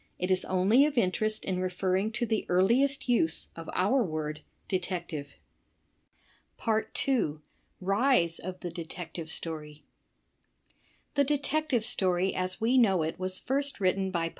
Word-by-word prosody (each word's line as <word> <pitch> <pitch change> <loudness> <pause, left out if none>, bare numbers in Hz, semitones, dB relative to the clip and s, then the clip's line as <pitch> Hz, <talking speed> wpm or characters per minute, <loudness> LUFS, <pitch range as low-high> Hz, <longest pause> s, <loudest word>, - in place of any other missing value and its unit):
It 180 +1 -1
is 185 0 +2
only 205 +10 +4
of 290 -3 -5
in 190 -6 +3
terest 215 +3 -2
in 185 -1 -1
referring 185 +3 0
to 235 +2 0
the 220 -2 -1
earliest 240 +11 +3
use 170 -10 +1
of 165 0 -8
our 210 +9 +3
word 155 -4 -4 0.3
''detective." 175 -5 -3 1.7
2. 155 - 0 0.4
Rise 195 -3 +2
of 185 +1 -7
the 175 - -4
Detective 165 -1 -7
Story 150 -2 -5 0.6
» - - -38
The 285 - +3
Detective 290 -3 0
Story 190 -5 +2
as 185 +1 -1
we 240 +4 +3
know 190 -8 +4
it 160 +3 -4
was 185 0 -1
first 280 0 -1
written 190 0 +1
by 170 -3 -1
185 Hz, 140 wpm, -29 LUFS, 170-235 Hz, 1.7 s, only